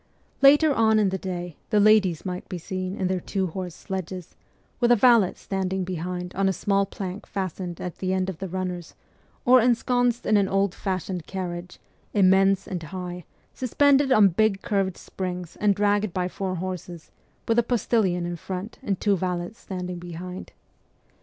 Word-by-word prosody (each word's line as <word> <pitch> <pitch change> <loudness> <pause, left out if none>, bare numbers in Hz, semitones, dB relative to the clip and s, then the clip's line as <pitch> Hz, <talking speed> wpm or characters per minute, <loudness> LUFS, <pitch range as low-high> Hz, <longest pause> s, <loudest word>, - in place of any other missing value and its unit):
Later 290 +2 +7
on 220 -3 +4
in 210 -2 +3
the 190 0 -3
day 175 -3 -5
the 210 - +3
ladies 205 -6 +4
might 180 -1 -5
be 185 - -4
seen 185 +2 -4
in 190 - -2
their 185 0 0
two 190 +2 -2
horse 180 0 -5
sledges, 185 -2 -6 0.4
with 240 -1 +3
a - - +8
valet 230 -5 +5
standing 190 -1 -2
behind 180 0 -4
on 195 0 +1
a - - +1
small 195 +2 +1
plank 195 +1 -6
fastened 185 -2 -4
at 180 - -6
the 185 -1 -1
end 185 0 0
of 190 -4 -5
the 190 - -4
runners, 180 -2 -4 0.5
or 255 0 +7
ensconced 245 0 +2
in 215 - +4
an 200 -1 +3
old 195 -1 +1
fashioned 185 -3 -3
carriage, 180 -2 -5 0.4
immense 195 0 +4
and 180 -3 -4
high, 180 +1 -6 0.3
suspended 275 +2 +3
on 210 -5 +7
big 195 +2 +1
curved 195 -3 0
springs 180 -3 -5
and 205 -1 +2
dragged 205 -1 +1
by 180 -1 0
four 185 0 -3
horses, 175 -2 -6 0.4
with 230 +1 +3
a - - +3
postillion 215 -7 +1
in 175 0 -4
front 190 +5 -6
and 195 -3 -2
two 205 -2 +2
valets 180 +3 -3
standing 180 -2 -5
behind. 175 +1 -8
190 Hz, 170 wpm, -25 LUFS, 180-205 Hz, 0.5 s, a